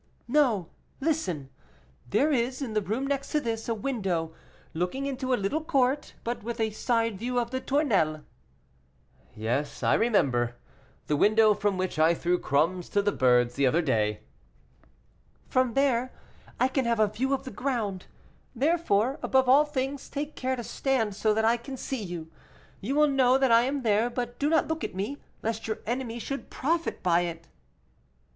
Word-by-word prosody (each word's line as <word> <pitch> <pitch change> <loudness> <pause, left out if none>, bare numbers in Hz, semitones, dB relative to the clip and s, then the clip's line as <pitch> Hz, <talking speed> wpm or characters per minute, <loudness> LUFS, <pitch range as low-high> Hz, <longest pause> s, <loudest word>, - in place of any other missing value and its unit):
"No; 240 - +2 0.3
listen. 190 - -2 0.6
There 295 - +2
is, 255 -1 0
in 260 -6 -4
the 215 - +1
room 220 +8 -2
next 275 0 -2
to 300 - +3
this, 230 -4 -3
a 230 - +1
window 195 -9 -2 0.4
looking 180 +12 -2
into 260 -1 -3
a - - +5
little 205 +11 -1
court, 270 -1 0
but 240 +1 -3
with 235 +2 -5
a 220 -1 +1
side 230 -2 0
view 245 +2 -1
of 235 0 -3
the 260 0 -2
Tournelles." 200 - +1 1.1
"Yes, 120 +7 -2
I - - +3
remember 130 - +2 0.5
the 150 - 0
window 215 +6 +5
from 205 -2 -1
which 185 -3 -2
I 160 +2 +5
threw 175 +1 0
crumbs 165 +6 0
to 205 - +1
the 205 - +2
birds 125 -5 +3
the 140 +1 +2
other 165 +7 +2
day." 105 -7 0 1.3
"From 255 -3 +1
there 255 -2 +2 0.5
I 255 - +4
can 265 -1 -1
have 235 -1 +1
a 215 - +6
view 245 +6 -2
of 275 - 0
the 260 - -7
ground; 215 -6 -3 0.5
therefore, 275 -3 +1
above 265 -1 +2
all 280 +4 +6
things, 275 -1 -3
take 295 +1 -4
care 260 0 -1
to 240 - -6
stand 230 -5 -1
so 215 +1 +1
that 220 0 +2
I 230 +1 +4
can 265 +3 -8
see 265 -1 -4
you; 170 -4 -6 0.5
you 255 +8 -3
will 300 0 +5
know 260 -2 +4
that 265 -2 +2
I 230 +1 +6
am 275 0 -2
there, 220 +1 +2
but 240 0 -4
do 290 - +1
not 320 0 +3
look 320 0 -3
at - - -4
me, 210 +10 -3 0.2
lest 225 0 -2
your 220 - -2
enemy 235 0 -3
should 275 +4 -5
profit 330 +4 -1
by 175 -2 +4
it." 165 -1 -5
235 Hz, 180 wpm, -27 LUFS, 190-265 Hz, 1.3 s, a